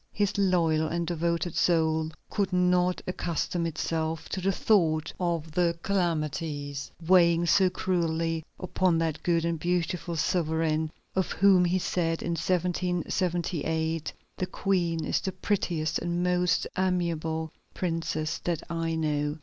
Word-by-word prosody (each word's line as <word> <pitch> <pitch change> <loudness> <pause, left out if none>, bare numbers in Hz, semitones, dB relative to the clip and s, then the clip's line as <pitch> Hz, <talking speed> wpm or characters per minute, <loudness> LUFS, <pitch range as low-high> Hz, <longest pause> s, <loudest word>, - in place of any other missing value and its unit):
His 205 -1 0
loyal 170 -5 +2
and 170 +1 -1
devoted 170 0 -1
soul 160 -2 +2 0.2
could 200 -2 0
not 180 0 +2
accustom 170 -1 -2
itself 160 0 -2
to 185 - -3
the 195 +2 +2
thought 160 -6 +2
of 170 -3 -1
the 170 +1 +1
calamities 150 -6 -2 0.2
weighing 170 -1 +5
so 185 +2 +4
cruelly 165 -3 -1 0.2
upon 185 -2 +1
that 165 -2 -1
good 170 -1 +1
and 170 -1 -1
beautiful 175 0 -1
sovereign 160 -2 0 0.3
of 190 -1 0
whom 190 -2 +5
he 175 +2 +2
said 165 -2 -1
in 170 - -2
1778: 170 -2 -1 0.3
"The 185 - -2
Queen 170 -5 0
is - - 0
the 190 - -2
prettiest 175 -5 -1
and 175 +1 -1
most 180 -2 +2
amiable 165 -4 -1 0.2
princess 165 -3 -2
that 170 -3 -2
I 165 -1 -1
know." 150 -1 -1
170 Hz, 130 wpm, -28 LUFS, 160-180 Hz, 0.3 s, weighing